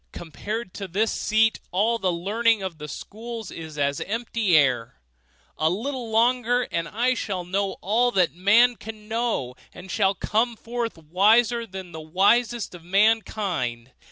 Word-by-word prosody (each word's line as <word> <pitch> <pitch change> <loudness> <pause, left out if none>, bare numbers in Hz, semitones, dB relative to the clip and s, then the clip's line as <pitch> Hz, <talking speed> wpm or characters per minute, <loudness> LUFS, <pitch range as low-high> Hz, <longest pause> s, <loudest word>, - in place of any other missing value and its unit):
Compared 205 +6 -6
to 195 - -6
this 210 +5 0
seat, 220 0 +2
all 220 +5 +1
the 185 -3 +1
learning 210 +5 +1
of 175 -5 -5
the 150 - -6
schools 225 - -7
is 160 -2 -8
as 140 -1 0
empty 220 -4 +1
air. 125 - +1 0.6
A 155 - +3
little 240 +6 -3
longer, 245 +2 +2
and 170 0 -1
I 245 +6 +1
shall 190 -7 -3
know 195 +2 -1
all 230 +6 +2
that 180 -3 +2
man 220 +7 +4
can 215 -1 -10
know, 220 - -1 0.2
and 180 +1 -9
shall 195 -2 +2
come 230 +5 0
forth 230 -2 -4
wiser 220 +9 +3
than 190 -2 -8
the 160 - -7
wisest 205 +9 +2
of 175 -2 -11
mankind. 185 - 0
205 Hz, 155 wpm, -24 LUFS, 175-230 Hz, 0.6 s, man